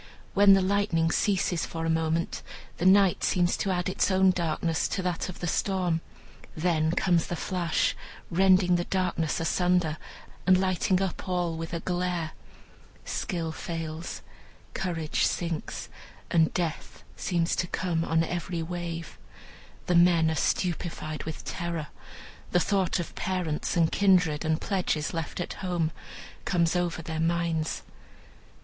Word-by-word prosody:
When 200 Hz, 0 st, +7 dB
the 195 Hz, -1 st, +4 dB
lightning 185 Hz, -4 st, +2 dB
ceases 190 Hz, -4 st, +1 dB
for 165 Hz, 0 st, -4 dB
a -, -, 0 dB
moment, 160 Hz, +1 st, 0 dB, 0.4 s
the 180 Hz, -, +2 dB
night 195 Hz, -1 st, +5 dB
seems 175 Hz, -1 st, +2 dB
to 200 Hz, -, -1 dB
add 180 Hz, -1 st, 0 dB
its 185 Hz, -, +1 dB
own 190 Hz, 0 st, +5 dB
darkness 165 Hz, -2 st, 0 dB
to 190 Hz, -, -2 dB
that 180 Hz, 0 st, -2 dB
of 185 Hz, -, -9 dB
the -, -, -2 dB
storm; 180 Hz, -2 st, 0 dB, 0.6 s
then 160 Hz, -1 st, +2 dB
comes 175 Hz, -3 st, +2 dB
the 175 Hz, -, -2 dB
flash, 175 Hz, -1 st, 0 dB, 0.4 s
rending 185 Hz, 0 st, +4 dB
the 175 Hz, -, -2 dB
darkness 180 Hz, -5 st, 0 dB
asunder, 175 Hz, -1 st, +1 dB, 0.5 s
and 185 Hz, -1 st, +6 dB
lighting 185 Hz, 0 st, +1 dB
up 190 Hz, 0 st, -4 dB
all 175 Hz, -2 st, 0 dB
with 165 Hz, 0 st, -5 dB
a 170 Hz, -1 st, -3 dB
glare. 175 Hz, -3 st, -1 dB, 0.7 s
Skill 170 Hz, -4 st, -2 dB
fails, 165 Hz, 0 st, -5 dB, 0.5 s
courage 165 Hz, -4 st, -1 dB
sinks, 170 Hz, -2 st, -3 dB, 0.4 s
and 160 Hz, -2 st, +4 dB
death 170 Hz, -3 st, -3 dB
seems 170 Hz, -2 st, 0 dB
to 175 Hz, -, 0 dB
come 170 Hz, -2 st, -1 dB
on 165 Hz, 0 st, +2 dB
every 170 Hz, 0 st, -3 dB
wave. 170 Hz, -1 st, -5 dB, 0.7 s
The 180 Hz, -, +1 dB
men 170 Hz, -2 st, +5 dB
are -, -, 0 dB
stupefied 160 Hz, -2 st, -1 dB
with 160 Hz, -1 st, -6 dB
terror. 170 Hz, -4 st, -3 dB, 0.6 s
The 180 Hz, -, +5 dB
thought 190 Hz, 0 st, +1 dB
of 175 Hz, -, -5 dB
parents, 180 Hz, -4 st, -2 dB
and 165 Hz, -1 st, +3 dB
kindred, 180 Hz, -7 st, +3 dB
and 160 Hz, 0 st, +1 dB
pledges 180 Hz, -6 st, -1 dB
left 165 Hz, 0 st, -4 dB
at 175 Hz, -, -3 dB
home, 175 Hz, -4 st, 0 dB, 0.5 s
comes 170 Hz, -2 st, +1 dB
over 175 Hz, -2 st, -1 dB
their 160 Hz, 0 st, -4 dB
minds. 165 Hz, -1 st, 0 dB
175 Hz, 140 wpm, -28 LUFS, 165-185 Hz, 0.7 s, When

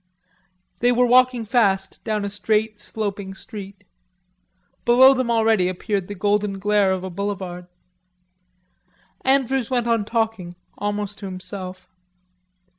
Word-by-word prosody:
They 245 Hz, +1 st, +3 dB
were 245 Hz, +1 st, +3 dB
walking 250 Hz, -1 st, +4 dB
fast 200 Hz, -4 st, +1 dB
down 215 Hz, -2 st, -1 dB
a -, -, -2 dB
straight, 215 Hz, +1 st, 0 dB
sloping 200 Hz, -2 st, -4 dB
street. 200 Hz, 0 st, -9 dB, 1.0 s
Below 260 Hz, +3 st, +7 dB
them 255 Hz, -2 st, -1 dB
already 220 Hz, -5 st, +3 dB
appeared 190 Hz, +1 st, -2 dB
the 205 Hz, -, -6 dB
golden 205 Hz, +1 st, 0 dB
glare 205 Hz, 0 st, +2 dB
of 185 Hz, -1 st, -2 dB
a 190 Hz, -, -5 dB
boulevard. 185 Hz, -2 st, -4 dB, 1.6 s
Andrews 265 Hz, -2 st, +2 dB
went 245 Hz, -2 st, 0 dB
on 230 Hz, -2 st, +1 dB
talking, 220 Hz, -5 st, -2 dB, 0.2 s
almost 205 Hz, 0 st, -3 dB
to 200 Hz, -, -6 dB
himself. 185 Hz, 0 st, -7 dB
205 Hz, 120 wpm, -22 LUFS, 195-230 Hz, 1.6 s, Below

